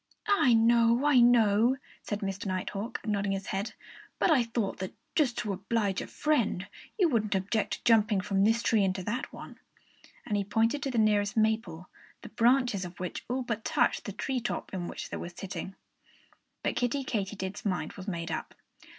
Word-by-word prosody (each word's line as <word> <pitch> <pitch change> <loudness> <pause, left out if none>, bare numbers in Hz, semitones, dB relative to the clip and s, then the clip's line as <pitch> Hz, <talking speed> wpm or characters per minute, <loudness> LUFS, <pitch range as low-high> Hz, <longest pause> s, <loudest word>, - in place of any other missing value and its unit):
"I 315 - +4
know 235 +3 +4
I 290 -4 +6
know," 235 0 +5 0.2
said 205 -1 -4
Mr. 195 0 -3
Nighthawk, 195 +4 -4
nodding 200 -2 0
his 195 0 -4
head. 195 +3 -3 0.4
"But - - +3
I 285 -5 +5
thought 230 -3 -2
that 185 0 -5 0.2
just 270 -7 +2
to 205 - -1
oblige 200 0 -1
a - - -6
friend 240 -11 0 0.3
you 375 -5 +4
wouldn't 215 -8 +1
object 200 +3 0
to - - -6
jumping 220 -3 +4
from 195 -1 +1
this 225 +3 +3
tree 220 -3 +3
into 190 -1 -1
that 235 +7 -3
one." - - -11 0.7
And 210 - -1
he 200 - +1
pointed 225 +7 +1
to 280 - -2
the 250 - -2
nearest 210 -1 +2
maple, 220 -6 0 0.4
the - - -8
branches 240 -2 +2
of 175 0 -9
which 180 -1 -4
all 255 +1 -1
but 230 -2 -3
touched - - +1
the 205 - -4
tree 255 +6 -2
top 240 -3 -4
in 175 -2 -3
which - - -7
they - - -3
were 175 - -5
sitting. 190 +2 -7 0.9
But - - -1
Kiddie 250 +3 0
Katydid's 200 -3 -3
mind 190 -5 -2
was 190 +1 -10
made 170 -4 -3
up. - - -4
215 Hz, 185 wpm, -29 LUFS, 195-240 Hz, 0.9 s, I